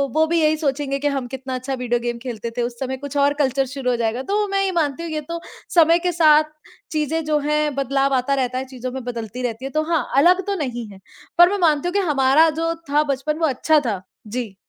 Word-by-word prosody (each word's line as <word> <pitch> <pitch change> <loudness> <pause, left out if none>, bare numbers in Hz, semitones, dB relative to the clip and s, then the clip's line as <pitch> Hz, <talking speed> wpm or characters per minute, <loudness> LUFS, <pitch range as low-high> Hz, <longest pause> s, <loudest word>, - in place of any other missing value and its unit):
वो 315 0 +4
भी 335 +1 +1
यही 310 0 +3
सोचेंगे 275 -2 -1
कि 290 - 0
हम 270 -3 -2
कितना 260 0 -5
अच्छा 255 +2 -4
वीडियो 245 -1 -1
गेम 240 0 -3
खेलते 235 -2 -5
थे। - - +1
उस 240 0 -4
समय 265 0 -3
कुछ 285 +1 -6
और 285 0 +3
कल्चर 270 0 +1
शुरू 260 -1 -3
हो - - +1
जाएगा। 235 +2 -1
तो 415 0 +1
मैं 395 0 0
ये 385 - 0
मानती 300 +1 -1
हूँ 335 - -5
ये 305 -1 -2
तो 335 0 -3 0.4
समय 335 0 +6
के - - +2
साथ 310 -3 +5 0.5
चीज़ें 315 +1 -1
जो 305 -1 +1
हैं 300 0 0
बदलाव 275 0 +1
आता 260 +2 +1
रहता 255 -2 -1
है, 260 - -3
चीज़ों 255 -1 -6
में 260 -1 -6
बदलती 240 0 -5
रहती 240 +1 -3
है। 270 - -5
तो 310 +3 0
हाँ, 330 - +1
अलग 360 +6 +5
तो 400 - 0
नहीं 245 - -4
है। 195 - -13 0.4
पर 350 +1 +8
मैं 410 - 0
मानती 300 +2 +1
हूँ 355 - -2
कि 405 - +2
हमारा 275 +4 +4
जो 330 +2 -1 0.2
था 295 +1 +3
बचपन 290 +1 -2
वो 325 - +2
अच्छा 305 +3 +2
था। 205 -5 -2 0.3
जी। 225 -3 -5
275 Hz, 250 wpm, -21 LUFS, 255-310 Hz, 0.5 s, पर